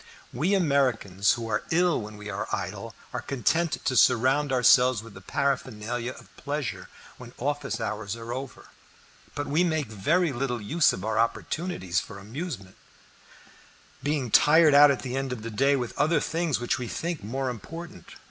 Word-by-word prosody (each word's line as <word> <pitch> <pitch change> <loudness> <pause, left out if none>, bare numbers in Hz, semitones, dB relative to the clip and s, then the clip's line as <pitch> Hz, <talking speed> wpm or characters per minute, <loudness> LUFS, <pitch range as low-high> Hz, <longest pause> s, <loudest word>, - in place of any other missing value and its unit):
We 170 +11 +1
Americans, 125 - +2
who 115 -1 -5
are 105 -1 0
ill 175 -2 +2
when 105 0 -9
we 105 0 -9
are - - -4
idle, - - -4 0.2
are - - -3
content 160 +5 0
to 130 - +1
surround 130 +4 +4
ourselves 125 -2 +5
with 115 -2 -12
the 95 - -12
paraphernalia 120 -1 -2
of - - -17
pleasure 145 -2 -4 0.3
when 125 -1 -11
office 140 -3 -2
hours 105 -2 -3
are 115 +1 -6
over; 130 +1 -7 0.7
but 145 - -2
we 155 +5 +2
make 160 -4 0
very 150 - +1
little 125 -1 -2
use 145 +9 +3
of 95 - -5
our 110 0 0
opportunities 115 - -1
for 110 - -9
amusement, 110 - -7 1.2
being 145 -5 -1
tired 155 +3 +6
out 145 +1 +8
at 140 - 0
the 130 -1 -4
end 135 -1 -2
of 120 -4 -5
the 115 - -5
day 135 +6 +3
with 125 -4 -3
other 150 +2 +3
things 160 -4 -1
which 120 - -1
we 125 - -4
think 170 - -4
more 130 +6 -3
important. 165 - -9
130 Hz, 170 wpm, -26 LUFS, 115-150 Hz, 1.2 s, out